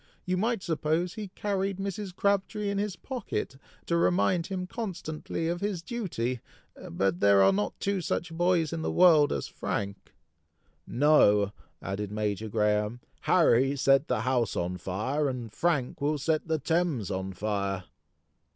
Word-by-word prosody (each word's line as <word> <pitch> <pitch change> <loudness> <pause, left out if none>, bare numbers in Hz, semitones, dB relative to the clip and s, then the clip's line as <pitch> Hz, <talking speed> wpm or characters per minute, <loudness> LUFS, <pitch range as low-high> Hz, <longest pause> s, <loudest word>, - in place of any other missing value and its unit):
You 185 - 0
might 220 +2 0
suppose 160 +2 0
he 215 -2 -6
carried 195 -2 -1
Mrs. 195 -1 -4
Crabtree 200 +1 0
in 200 - -1
his 205 -2 -2
pocket, 235 - -4 0.3
to 170 - 0
remind 175 0 +2
him 185 -2 -3
constantly 175 -6 -4
of 175 +2 -2
his 200 -4 -2
duty; 155 - -3 0.5
but 90 +1 0
there 100 -1 +6
are 95 0 +5
not 105 +2 -2
two 200 -2 0
such 170 0 -2
boys 170 -2 +1
in 165 - -3
the - - -1
world 160 -5 +6
as - - -2
Frank!" 100 0 -5 0.7
"No," 105 -8 +4 0.3
added 100 +1 -4
Major 105 0 -2
Graham; 105 +2 +1 0.2
"Harry 135 -6 +3
set 135 +1 +3
the - - 0
house 125 -3 0
on 90 +1 -2
fire, 125 - -1
and 120 -4 -6
Frank 150 -8 0
will 150 +1 +1
set 155 +3 0
the 160 -1 +1
Thames 155 - 0
on 95 0 -3
fire!" 100 -1 -2
155 Hz, 150 wpm, -28 LUFS, -, 0.7 s, there